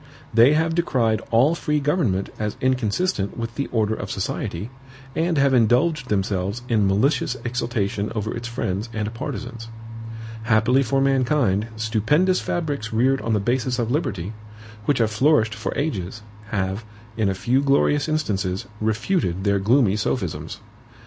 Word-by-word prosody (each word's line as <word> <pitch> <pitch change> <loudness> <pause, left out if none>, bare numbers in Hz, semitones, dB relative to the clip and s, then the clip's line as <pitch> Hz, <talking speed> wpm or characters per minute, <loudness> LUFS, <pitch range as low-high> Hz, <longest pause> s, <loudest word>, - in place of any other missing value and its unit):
They 115 +6 +6
have 160 +1 +2
decried 125 -10 +1
all 125 +8 +4
free 150 -3 0
government 140 - 0
as 105 -1 -2
inconsistent 125 - 0
with 115 0 -4
the 140 +2 -2
order 110 -2 0
of 95 -3 -5
society, 95 +2 -3 0.4
and 165 0 +1
have 140 -1 +4
indulged 125 +4 +3
themselves 100 +2 -1
in 110 -5 +2
malicious 125 +6 +1
exultation 115 -4 -1
over 110 0 -2
its 120 0 -5
friends 115 -2 -3
and 110 0 -3
partisans. 115 0 -6 0.7
Happily 120 +3 +3
for 135 +2 +1
mankind, 130 -6 +2
stupendous 110 - +2
fabrics 145 -10 -2
reared 130 +4 +2
on 115 - -1
the 105 - +2
basis 120 +3 0
of 120 -1 -1
liberty, 110 - -2 0.5
which 145 - +2
have 115 -2 +2
flourished 110 -2 +3
for - - -4
ages, 105 - -3 0.3
have, 100 0 -2 0.3
in 110 -3 +1
a 95 - -1
few 125 +7 +1
glorious 140 +2 +2
instances, 100 -12 -1
refuted 110 - 0
their 100 -1 +2
gloomy 110 0 +3
sophisms. 85 - -2
115 Hz, 145 wpm, -23 LUFS, 105-135 Hz, 0.7 s, They